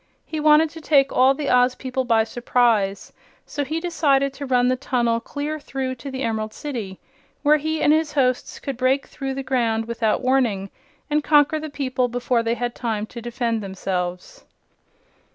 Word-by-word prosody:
He 315 - -4
wanted 305 +1 +5
to 325 - -10
take 280 -3 +3
all 260 +2 +5
the 285 0 -2
Oz 250 0 +4
people 260 0 -3
by 225 -2 +3
surprise; 225 -4 0 0.3
so 290 - -3
he 310 +4 -2
decided 285 -6 +1
to 280 0 -7
run 250 -1 +3
the 255 - +2
tunnel 240 -3 0
clear 295 +5 -4
through 265 -2 -4
to 280 - -6
the 265 0 -4
Emerald 220 -2 -2
City, 225 -10 -5 0.4
where 300 +1 +5
he 315 +1 -2
and 295 - +5
his 315 -1 +1
hosts 255 -3 0
could 275 -3 -5
break 260 +2 +1
through 270 -2 -5
the 270 - -4
ground 230 -4 0
without 230 0 -1
warning 235 -7 +1 0.4
and 300 0 0
conquer 295 +1 +4
the 310 0 -6
people 260 -3 -1
before 245 0 0
they 230 0 0
had 240 0 -3
time 220 -4 -2
to 235 +2 -9
defend 235 -1 -2
themselves. 190 - -4
255 Hz, 180 wpm, -22 LUFS, 230-285 Hz, 0.4 s, wanted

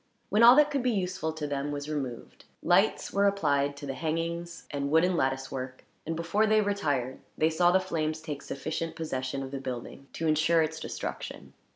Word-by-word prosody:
When 210 - +3
all 240 +2 +10
that 300 +1 +5
could 280 -2 0
be 250 - +1
useful 185 -6 -1
to 155 -1 -4
them 145 0 -2
was 145 0 -4
removed, 135 -6 -5 0.2
lights - - +2
were 200 0 +4
applied 145 -7 +1
to 145 - -7
the 135 - -3
hangings 170 +3 -3
and 140 -1 -2
wooden 170 +4 +3
lattice 135 -2 0
work; 130 -1 -6 0.2
and, 165 - -1
before 170 +7 +1
they 215 0 +4
retired, 145 - -1 0.2
they 160 +1 +3
saw 175 +2 +4
the 185 +2 +5
flames 160 -4 -2
take 150 -3 -6
sufficient 160 +4 -4
possession 135 -4 -3
of 135 - -7
the 140 - -4
building 130 +1 -6
to 165 - -3
ensure 160 +1 +3
its 160 +1 -3
destruction. - - -6
160 Hz, 195 wpm, -29 LUFS, 140-175 Hz, 0.2 s, all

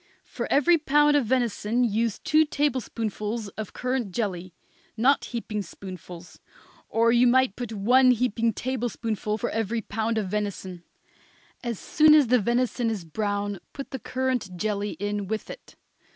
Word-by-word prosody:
For - - -5
every 315 +4 +4
pound 295 0 +4
of 275 -6 +2
venison 240 -1 +1
use 225 -2 0
two 310 0 +3
tablespoonfuls 230 -7 -2
of 215 +1 -7
currant 250 -5 -2
jelly 185 -4 -3 0.5
not 265 +5 +3
heaping 225 -3 -4
spoonfuls; 180 -2 -10 0.5
or 230 +1 +3
you 240 +1 +5
might 255 -3 +3
put 240 -2 -5
one 245 +5 +4
heaping 235 -2 +2
tablespoonful 230 -3 -3
for - - -3
every 225 +1 -1
pound 220 +2 -2
of 210 -3 -1
venison. 190 -3 -4 0.8
As 235 -3 -3
soon 305 +7 +5
as 290 -6 +4
the 250 0 +5
venison 240 +2 0
is 205 -6 -4
brown 205 +2 -2
put 275 - -7
the 265 - -4
currant 255 -6 -2
jelly 205 +1 -2
in 205 0 -3
with 220 +2 -4
it. - - -12
225 Hz, 150 wpm, -26 LUFS, 205-255 Hz, 0.8 s, you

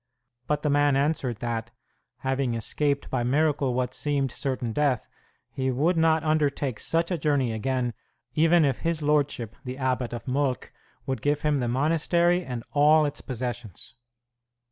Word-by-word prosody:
But 150 -1 0
the 150 - +1
man 145 -1 +3
answered 135 -4 0
that, 115 -1 -3 0.5
having 130 -2 0
escaped 140 +5 -1
by 130 - 0
miracle 140 0 +1
what 125 0 -1
seemed 140 -3 -1
certain 125 -4 -3
death, 140 -4 +1 0.4
he 130 -1 -1
would 150 +8 +2
not 160 -1 +3
undertake 145 -6 0
such 165 +2 0
a 175 - -1
journey 140 -5 +1
again 125 +1 -1 0.4
even 165 +1 +4
if 135 -3 0
his 165 -2 -1
lordship, 145 -7 0
the 130 0 -6
abbot 130 -2 -1
of 120 +2 -7
Molk, 130 0 -1 0.3
would 130 -1 -3
give 145 0 0
him 150 -2 +2
the 120 - -1
monastery 165 +7 +2
and 125 -6 -5
all 150 +1 +5
its 145 0 -4
possessions. 120 - -6
140 Hz, 155 wpm, -26 LUFS, 125-150 Hz, 0.5 s, all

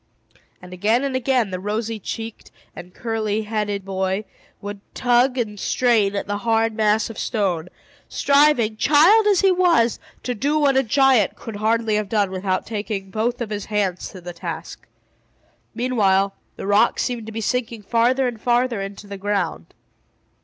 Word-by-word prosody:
And 180 0 -10
again 215 +8 +1
and 275 -2 -2
again 255 -5 +1
the 185 - -3
rosy 215 +3 -3
checked 225 +3 -7 0.3
and 180 - -10
curly 220 0 -2
headed 210 -2 -3
boy 190 +1 -2 0.3
would 205 0 -7
tug 250 +1 +2
and 210 -4 -3
strain 220 -5 +2
at 200 - -2
the 205 0 -3
huge 225 0 +1
mass 215 0 +1
of 225 - -9
stone, 180 -7 -1 0.4
striving, 280 -6 +3
child 340 - +5
as 400 -3 +4
he 390 -1 +4
was, 345 -11 +3 0.2
to 250 - -2
do 285 +7 0
what 285 -3 +3
a 265 - +5
giant 265 -3 +3
could 225 -3 -8
hardly 220 +1 +1
have 210 -2 -3
done 205 -4 +1
without 185 0 -2
taking 205 -3 -4
both 235 +4 -1
of 220 -3 -4
his 205 -1 -4
great 210 - -2
hands 185 -3 -2
to 185 - -11
the 175 0 -7
task. 170 -1 -7 0.9
Meanwhile 200 -6 +2 0.2
the - - -7
rock 205 +4 +3
seemed 240 -3 -2
to - - -6
be 225 - -5
sinking 230 -1 -2
farther 245 +5 +2
and 230 -3 -5
farther 240 -3 +1
into 195 +1 -7
the 200 -1 -7
ground. 190 - -2
220 Hz, 170 wpm, -22 LUFS, 200-245 Hz, 0.9 s, child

